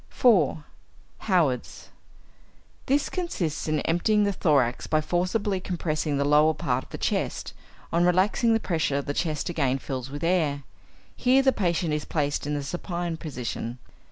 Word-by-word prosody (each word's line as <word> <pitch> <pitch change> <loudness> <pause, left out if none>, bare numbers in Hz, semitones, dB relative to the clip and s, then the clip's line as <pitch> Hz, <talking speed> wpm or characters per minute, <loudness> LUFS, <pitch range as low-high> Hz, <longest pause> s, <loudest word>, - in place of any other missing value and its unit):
4. 175 - +3 0.7
Howard's. 150 -10 0 1.0
This 280 +2 +2
consists 180 - -3
in 155 -1 +1
emptying 210 +6 +2
the 200 -1 +1
thorax 140 -9 +1
by 155 - +2
forcibly 185 +5 0
compressing 155 -5 -2
the 140 - +1
lower 150 +2 +4
part - - -1
of - - -22
the - - -6
chest; - - -2 0.4
on 170 +1 +3
relaxing 190 +6 +3
the 225 - +3
pressure 155 -8 -1
the 145 - -3
chest 155 -1 -2
again 135 -6 0
fills 130 -1 -5
with 145 +2 -7
air. 160 -5 +1 0.5
Here 260 +2 +3
the 265 - +5
patient 170 -5 0
is 150 0 -2
placed 145 -2 -1
in 150 - -1
the 145 - -3
supine 175 +2 -3
position. 125 -5 -5
160 Hz, 155 wpm, -26 LUFS, 145-185 Hz, 1.0 s, the